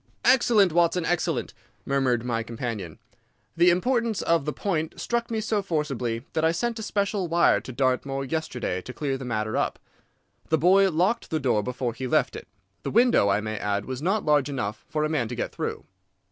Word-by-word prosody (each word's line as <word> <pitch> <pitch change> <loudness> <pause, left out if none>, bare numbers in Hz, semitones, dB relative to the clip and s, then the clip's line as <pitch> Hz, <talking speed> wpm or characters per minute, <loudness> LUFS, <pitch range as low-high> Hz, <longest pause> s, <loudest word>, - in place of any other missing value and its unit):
"Excellent, 235 -8 +5
Watson, 175 0 +2
excellent!" 175 0 -1 0.3
murmured 130 -4 +1
my 115 -2 -1
companion. 115 -7 -5 0.6
"The 175 +1 +5
importance 230 +4 +1
of 165 -4 +2
the 150 - -1
point 160 -3 -2
struck 235 0 -1
me 225 -2 -1
so 215 -1 0
forcibly 135 -9 -2
that 160 - 0
I 160 - +4
sent 235 +6 -2
a - - -4
special 200 -3 -1
wire 170 +1 +3
to - - -8
Dartmoor 135 +2 0
yesterday 125 - -3
to 125 - -9
clear 140 -1 -2
the 135 -1 -6
matter 110 -2 -2
up. - - 0 0.7
The 160 - +3
boy 190 +5 +5
locked 185 +7 0
the 160 - 0
door 125 -7 +1
before 125 +1 -3
he 130 +2 -5
left - - +1
it. - - -8 0.3
The - - -4
window, 235 - +4
I 100 +2 +2
may 110 0 -4
add, 100 0 -1
was 130 0 -5
not 195 +6 0
large 150 -2 +3
enough 110 -6 -4
for 150 -1 -1
a - - +2
man 150 -7 0
to 120 - -5
get - - -3
through. - - -4
150 Hz, 195 wpm, -26 LUFS, 125-185 Hz, 0.7 s, Excellent